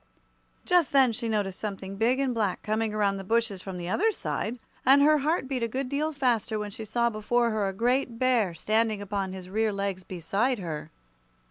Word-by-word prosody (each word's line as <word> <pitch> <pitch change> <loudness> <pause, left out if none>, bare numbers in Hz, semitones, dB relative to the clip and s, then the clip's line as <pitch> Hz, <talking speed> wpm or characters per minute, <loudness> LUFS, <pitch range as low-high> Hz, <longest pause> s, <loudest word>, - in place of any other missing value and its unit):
Just 350 -6 +3
then 265 -3 +5
she 230 +1 -3
noticed 205 -4 -1
something 195 -2 -5
big 235 +6 +2
and 270 -2 +1
black 210 -5 -1
coming 220 0 0
around 205 -2 +1
the 195 - -6
bushes 225 -2 0
from 190 -1 -6
the 175 -1 -5
other 425 - +2
side, 245 - -3 0.3
and 275 +2 +6
her 305 +1 +5
heart 300 -1 0
beat 260 -2 -2
a 230 - +1
good 255 +3 -3
deal 300 +3 0
faster 245 -7 0
when 210 -1 -4
she 220 +2 -7
saw 235 +2 +1
before 235 +2 +1
her 215 -2 0
a - - -1
great 240 +4 0
bear 230 -8 +2
standing 215 +4 +1
upon 200 -1 -3
his 185 -1 -8
rear 215 +3 0
legs 195 -2 -3
beside 195 +9 -1
her. 165 -6 -5
220 Hz, 205 wpm, -27 LUFS, 195-255 Hz, 0.3 s, and